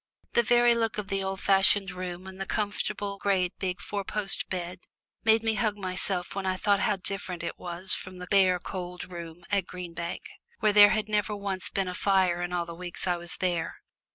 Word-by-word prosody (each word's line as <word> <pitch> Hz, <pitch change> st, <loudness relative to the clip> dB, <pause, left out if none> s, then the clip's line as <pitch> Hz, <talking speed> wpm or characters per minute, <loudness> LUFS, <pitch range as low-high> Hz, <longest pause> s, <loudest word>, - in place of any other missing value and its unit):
The -, -, +5 dB
very 240 Hz, +1 st, +4 dB
look 225 Hz, -2 st, 0 dB
of 210 Hz, -1 st, -4 dB
the 195 Hz, 0 st, 0 dB
old 190 Hz, 0 st, -3 dB
fashioned 195 Hz, 0 st, +4 dB
room 180 Hz, 0 st, -6 dB
and 190 Hz, 0 st, -9 dB
the 195 Hz, -, -3 dB
comfortable 205 Hz, -1 st, -2 dB
great 185 Hz, -3 st, +1 dB
big 185 Hz, 0 st, -2 dB
four 200 Hz, 0 st, -4 dB
post 200 Hz, 0 st, +2 dB
bed 180 Hz, 0 st, -4 dB, 0.4 s
made 225 Hz, 0 st, +4 dB
me 225 Hz, 0 st, +2 dB
hug 215 Hz, 0 st, 0 dB
myself 185 Hz, -1 st, -1 dB
when 195 Hz, -, -3 dB
I 185 Hz, -, +1 dB
thought 200 Hz, +1 st, +2 dB
how 205 Hz, -, +2 dB
different 185 Hz, -2 st, -5 dB
it -, -, -3 dB
all -, -, -14 dB
was 175 Hz, +2 st, +3 dB
from 185 Hz, 0 st, -3 dB
the 180 Hz, -, -7 dB
bare 185 Hz, -1 st, +4 dB
cold 180 Hz, 0 st, -7 dB
room 170 Hz, 0 st, -8 dB
at 200 Hz, -1 st, +1 dB
Green 180 Hz, -2 st, -7 dB
Bank, 170 Hz, +1 st, -5 dB, 0.4 s
where 210 Hz, -, +3 dB
there 205 Hz, 0 st, +9 dB
had 215 Hz, 0 st, 0 dB
never 210 Hz, -1 st, 0 dB
once 195 Hz, -2 st, -4 dB
been 195 Hz, -1 st, -1 dB
a 180 Hz, -, -3 dB
fire 185 Hz, -2 st, +2 dB
all 175 Hz, -1 st, -1 dB
the 170 Hz, -, -8 dB
weeks 175 Hz, 0 st, -6 dB
I 180 Hz, -1 st, +1 dB
was 175 Hz, 0 st, -4 dB
there. 175 Hz, -3 st, -1 dB
190 Hz, 210 wpm, -28 LUFS, 180-205 Hz, 0.4 s, there